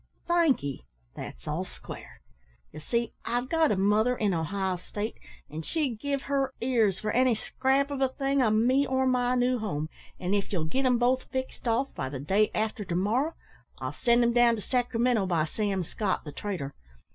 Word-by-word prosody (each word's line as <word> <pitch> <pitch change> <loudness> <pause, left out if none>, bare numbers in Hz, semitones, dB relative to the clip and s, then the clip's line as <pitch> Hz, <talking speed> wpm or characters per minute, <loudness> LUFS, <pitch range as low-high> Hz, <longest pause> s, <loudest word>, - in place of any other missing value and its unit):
"Thank'ee; 270 - +1 0.3
that's - - -8
all - - -1
square. - - -11 0.5
Ye 155 - -9
see, 235 +8 -1
I've 245 +2 -1
got 325 -1 +3
a - - +3
mother 210 +6 +3
in 205 -3 +1
Ohio 185 +3 -1
State, 205 +5 -5 0.3
an' 155 +2 -6
she'd 265 - -1
give 280 0 -2
her 275 -1 0
ears 230 -6 +2
for 215 - -2
any 250 0 +4
scrap 270 +5 +1
of 275 -1 -3
a 265 - +3
thing 275 +1 0
o' 235 - +4
me 245 +6 +3
or 260 0 +1
my 250 -1 +2
new 250 0 +2
home; 155 -8 -2 0.3
an' 185 +1 -1
if 200 -1 0
ye'll 170 -6 0
git 265 +12 0
'em 250 -1 +4
both 250 +2 +2
fixed 260 -1 -4
off 235 +4 +1
by 130 -2 -3
the 135 -1 -5
day 195 +10 +2
arter 215 0 -1
to 175 -3 -3
morrow, 235 - +1 0.4
I'll - - -4
send 240 0 +3
'em 235 0 +3
down 240 -1 +5
to 210 - -7
Sacramento 240 -4 +1
by 165 -4 +2
Sam 195 +2 -1
Scott, 190 +3 -2
the 150 - -7
trader. 170 -7 -4
230 Hz, 190 wpm, -28 LUFS, 195-260 Hz, 0.5 s, down